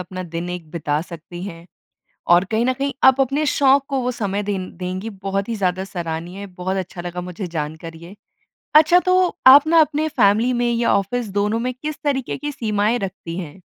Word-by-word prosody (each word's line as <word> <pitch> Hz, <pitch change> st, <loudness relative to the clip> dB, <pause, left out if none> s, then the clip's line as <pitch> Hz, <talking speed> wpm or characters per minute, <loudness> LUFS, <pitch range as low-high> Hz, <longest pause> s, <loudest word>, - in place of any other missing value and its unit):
अपना 185 Hz, +1 st, -6 dB
दिन 170 Hz, +1 st, -3 dB
एक 175 Hz, -3 st, -7 dB
बिता 150 Hz, -3 st, -1 dB
सकती 175 Hz, +1 st, -10 dB
हैं 170 Hz, -3 st, -9 dB, 0.7 s
और 175 Hz, +2 st, +4 dB
कहीं 225 Hz, +1 st, +1 dB
न 255 Hz, -, +3 dB
कहीं 275 Hz, +1 st, -2 dB
आप 265 Hz, 0 st, +6 dB
अपने 275 Hz, +3 st, +1 dB
शौक 275 Hz, -1 st, +3 dB
को 275 Hz, -2 st, -1 dB
वो 250 Hz, -, 0 dB
समय 205 Hz, -3 st, -2 dB
दें 195 Hz, -3 st, -4 dB
देंगी। 185 Hz, +4 st, -4 dB
बहुत 195 Hz, 0 st, -3 dB
ही 230 Hz, -, -2 dB
ज़्यादा 185 Hz, -1 st, -1 dB
सराहनीय, 175 Hz, +1 st, -5 dB
बहुत 185 Hz, 0 st, -4 dB
अच्छा 185 Hz, -1 st, -5 dB
लगा 175 Hz, 0 st, -5 dB
मुझे 180 Hz, +2 st, -6 dB
जानकर 160 Hz, 0 st, -5 dB
ये। 170 Hz, +5 st, -12 dB, 0.6 s
अच्छा, 315 Hz, +3 st, +7 dB
तो 365 Hz, 0 st, +2 dB
आप 280 Hz, +3 st, +9 dB
ना 330 Hz, 0 st, +5 dB
अपने 310 Hz, 0 st, +1 dB
फ़ैमिली 225 Hz, -1 st, +3 dB
में 240 Hz, 0 st, 0 dB
या 235 Hz, 0 st, +1 dB
ऑफ़िस, 220 Hz, +4 st, -1 dB
दोनों 205 Hz, +3 st, 0 dB
में 250 Hz, +2 st, -2 dB
किस 300 Hz, +3 st, -5 dB
तरीके 270 Hz, -3 st, -1 dB
की 295 Hz, 0 st, -4 dB
सीमाएँ 215 Hz, -1 st, 0 dB
रखती 180 Hz, -4 st, -6 dB
हैं? 170 Hz, 0 st, -8 dB
200 Hz, 195 wpm, -21 LUFS, 180-255 Hz, 0.7 s, आप